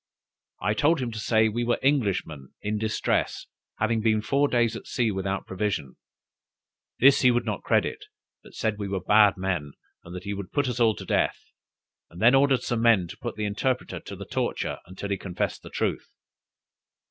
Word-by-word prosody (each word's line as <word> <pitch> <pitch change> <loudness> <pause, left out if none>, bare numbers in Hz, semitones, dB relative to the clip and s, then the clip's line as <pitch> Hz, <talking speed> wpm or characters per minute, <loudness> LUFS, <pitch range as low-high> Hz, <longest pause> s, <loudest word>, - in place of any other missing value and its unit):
I 105 - 0
told 150 +9 +2
him 125 -2 -3
to 110 - -6
say 110 0 +3
we 115 +2 -1
were 120 0 +1
Englishmen 100 - 0
in 105 +1 -1
distress, 110 0 -1 0.3
having 110 +1 +1
been 110 -1 +2
four 140 +5 +2
days 120 -3 +1
at - - -9
sea 115 -3 0
without 95 0 -3
provisions. 95 -9 -3 1.0
This 140 +2 +6
he 125 - +6
would 120 -1 +1
not 105 -4 -3
credit, - - 0 0.4
but - - -16
said 110 -1 -1
we 100 - -3
were 95 -1 -2
bad 105 +2 +5
men, 90 -7 -2 0.3
and 85 +1 -10
that 90 - -7
he 100 +1 -3
would 100 -2 -7
put 145 -2 +1
us 125 -1 -2
all 115 -2 +4
to - - -8
death; - - +1 0.7
and 85 - -12
then 120 +5 +6
ordered 135 -1 +4
some 120 -2 -1
men 115 -7 +4
to - - -9
put 120 - -5
the 105 - -2
interpreter 115 +5 -2
to - - -9
the - - -8
torture - - -2
until 95 +2 -7
he 100 - 0
confessed 90 -3 -3
the - - -11
truth. - - -2
110 Hz, 195 wpm, -26 LUFS, 100-120 Hz, 1.0 s, This